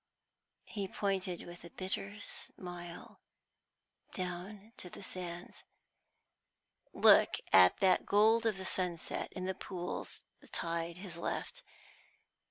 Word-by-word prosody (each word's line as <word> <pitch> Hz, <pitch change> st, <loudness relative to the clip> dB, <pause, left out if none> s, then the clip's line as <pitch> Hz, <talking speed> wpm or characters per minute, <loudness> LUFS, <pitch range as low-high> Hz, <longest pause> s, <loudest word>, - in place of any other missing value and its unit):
He 200 Hz, -2 st, -3 dB
pointed 190 Hz, -2 st, -1 dB
with 175 Hz, 0 st, -10 dB
a 170 Hz, -, -9 dB
bitter 195 Hz, +3 st, -4 dB
smile 175 Hz, -3 st, -7 dB, 0.9 s
down 190 Hz, +4 st, -5 dB
to 180 Hz, -, -7 dB
the 195 Hz, -, -10 dB
sands. 175 Hz, -2 st, -6 dB, 1.3 s
"Look -, -, +7 dB, 0.2 s
at 90 Hz, -1 st, +8 dB
that 190 Hz, -1 st, +4 dB
gold 225 Hz, +3 st, +5 dB
of 215 Hz, -3 st, +1 dB
the 190 Hz, -, -5 dB
sunset 180 Hz, -3 st, -2 dB
in 185 Hz, -, -4 dB
the 190 Hz, -, 0 dB
pools 180 Hz, -1 st, -5 dB, 0.2 s
the -, -, -17 dB
tide 170 Hz, 0 st, -2 dB
has 180 Hz, -2 st, -7 dB
left. -, -, -3 dB
185 Hz, 115 wpm, -34 LUFS, 175-195 Hz, 1.3 s, at